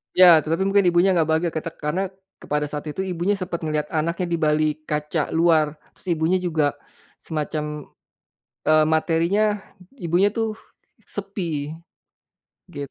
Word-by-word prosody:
Ya, 185 Hz, -, +8 dB
tetapi 165 Hz, +5 st, -1 dB
mungkin 195 Hz, -1 st, +3 dB
ibunya 175 Hz, +2 st, +4 dB
nggak 165 Hz, -4 st, +2 dB
bahagia 160 Hz, +1 st, +1 dB
kita 160 Hz, +1 st, -4 dB
karena 175 Hz, +6 st, -2 dB, 0.3 s
kepada 150 Hz, 0 st, -2 dB
saat 150 Hz, +1 st, -5 dB
itu 190 Hz, +6 st, -3 dB
ibunya 185 Hz, +2 st, 0 dB
sempat 180 Hz, -3 st, -4 dB
ngelihat 150 Hz, -1 st, -2 dB
anaknya 170 Hz, +3 st, -1 dB
di 170 Hz, -, +1 dB
balik 155 Hz, 0 st, +1 dB
kaca 150 Hz, +1 st, -1 dB
luar. 160 Hz, -3 st, +3 dB, 0.2 s
Si 175 Hz, -3 st, -3 dB
ibunya 165 Hz, +4 st, +1 dB
juga 160 Hz, -5 st, +1 dB, 0.5 s
semacam, 150 Hz, -1 st, -4 dB, 0.8 s
eee, 155 Hz, 0 st, +5 dB
materinya, 165 Hz, +5 st, +2 dB, 0.6 s
ibunya 180 Hz, 0 st, +2 dB
tuh, 225 Hz, 0 st, -2 dB, 0.5 s
sepi. 170 Hz, -9 st, -4 dB, 0.9 s
Gitu. 140 Hz, -1 st, -7 dB
165 Hz, 135 wpm, -23 LUFS, 155-180 Hz, 0.9 s, Ya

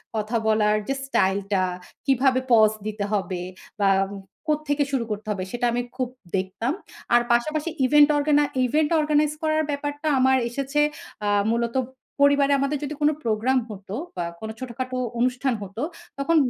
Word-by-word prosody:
কথা 215 Hz, +2 st, -1 dB
বলার 215 Hz, -1 st, +3 dB
যে 275 Hz, -, +1 dB
স্টাইলটা 195 Hz, -5 st, +1 dB, 0.4 s
কিভাবে 265 Hz, -1 st, +3 dB
পজ 220 Hz, -2 st, +7 dB, 0.2 s
দিতে 210 Hz, -1 st, -3 dB
হবে? 185 Hz, -3 st, -1 dB, 0.4 s
বা 200 Hz, -1 st, +4 dB, 0.6 s
কোত্থেকে 300 Hz, -1 st, +1 dB
শুরু 265 Hz, -4 st, +1 dB
করতে 210 Hz, +1 st, -4 dB
হবে? 195 Hz, -3 st, -2 dB
সেটা 240 Hz, 0 st, -1 dB
আমি 245 Hz, -, 0 dB, 0.2 s
খুব 255 Hz, -2 st, -1 dB, 0.3 s
দেখতাম। 190 Hz, +8 st, -2 dB, 0.4 s
আর 240 Hz, -, +7 dB
পাশাপাশি 305 Hz, +7 st, 0 dB, 0.2 s
ইভেন্ট 295 Hz, +3 st, +6 dB
অর্গানা 295 Hz, 0 st, +3 dB, 0.2 s
ইভেন্ট 300 Hz, +4 st, +2 dB
অর্গানাইজ 300 Hz, 0 st, +2 dB
করার 310 Hz, 0 st, +1 dB
ব্যাপারটা 290 Hz, +1 st, -3 dB
আমার 260 Hz, 0 st, +4 dB
এসেছে 275 Hz, +4 st, -2 dB, 0.5 s
আ -, -, 0 dB, 0.3 s
মূলত 235 Hz, +1 st, -1 dB, 0.5 s
পরিবারে 285 Hz, 0 st, +5 dB
আমাদের 275 Hz, +2 st, 0 dB
যদি 290 Hz, +1 st, -3 dB
কোন 295 Hz, -, +5 dB
প্রোগ্রাম 230 Hz, +4 st, +2 dB
হতো 200 Hz, -1 st, -7 dB, 0.2 s
বা 175 Hz, -2 st, -2 dB
কোনো 220 Hz, 0 st, -5 dB
ছোটখাটো 255 Hz, 0 st, -4 dB, 0.2 s
অনুষ্ঠান 250 Hz, +2 st, +1 dB
হত, 195 Hz, +1 st, -11 dB, 0.4 s
তখন 275 Hz, +4 st, +1 dB
255 Hz, 150 wpm, -24 LUFS, 215-290 Hz, 0.6 s, পজ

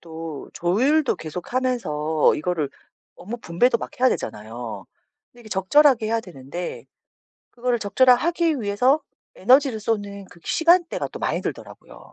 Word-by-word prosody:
또 160 Hz, -3 st, -8 dB
조율도 260 Hz, -, +2 dB
계속하면서 160 Hz, -, 0 dB
이거를 155 Hz, -3 st, -2 dB, 0.5 s
업무 210 Hz, +7 st, -6 dB
분배도 230 Hz, +6 st, +1 dB
막 -, -, -6 dB
해야 260 Hz, -, +6 dB
되잖아요. 110 Hz, -, -5 dB, 0.5 s
근데 245 Hz, -, -18 dB
이게 225 Hz, -, -13 dB
적절하게 225 Hz, +5 st, +4 dB
해야 225 Hz, +1 st, 0 dB
되는데 170 Hz, -2 st, -7 dB, 0.7 s
그거를 245 Hz, 0 st, -1 dB
적절하게 245 Hz, +4 st, +4 dB
하기 335 Hz, -4 st, +1 dB
위해서 245 Hz, +8 st, +2 dB, 0.3 s
에너지를 255 Hz, +2 st, +3 dB
쏟는 205 Hz, -2 st, -3 dB
그 170 Hz, -, -17 dB
시간대가 340 Hz, +1 st, +2 dB
또 -, -, -9 dB
많이 -, -, -1 dB
들더라고요. -, -, -8 dB
215 Hz, 335 characters per minute, -23 LUFS, 170-255 Hz, 0.7 s, 해야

